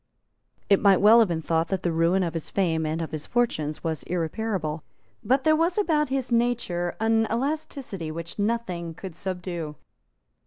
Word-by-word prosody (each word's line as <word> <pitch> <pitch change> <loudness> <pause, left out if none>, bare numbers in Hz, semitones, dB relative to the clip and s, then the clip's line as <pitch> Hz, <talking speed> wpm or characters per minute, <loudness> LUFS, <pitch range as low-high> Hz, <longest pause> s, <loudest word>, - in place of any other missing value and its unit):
It 200 - +4
might 200 -2 +6
well 215 +5 +7
have 225 - +5
been 165 -2 -2
thought 165 +1 +1
that 190 +2 -2
the 175 - +1
ruin 165 +3 +2
of 170 -2 -2
his 165 -2 -4
fame 160 -5 0
and 160 +2 -2
of 160 - -6
his 155 -2 -5
fortunes 155 -11 -1
was 160 -2 -2
irreparable. 170 -2 -2 0.4
But 265 +2 +2
there 310 +1 +5
was 335 +4 +1
about 310 -8 +2
his 265 -2 -2
nature 230 -8 0
an 225 0 +2
elasticity 260 - -3
which 165 +4 -6
nothing 200 -7 -2
could 190 0 -8
subdue. 175 -4 -4
185 Hz, 170 wpm, -25 LUFS, 165-235 Hz, 0.4 s, well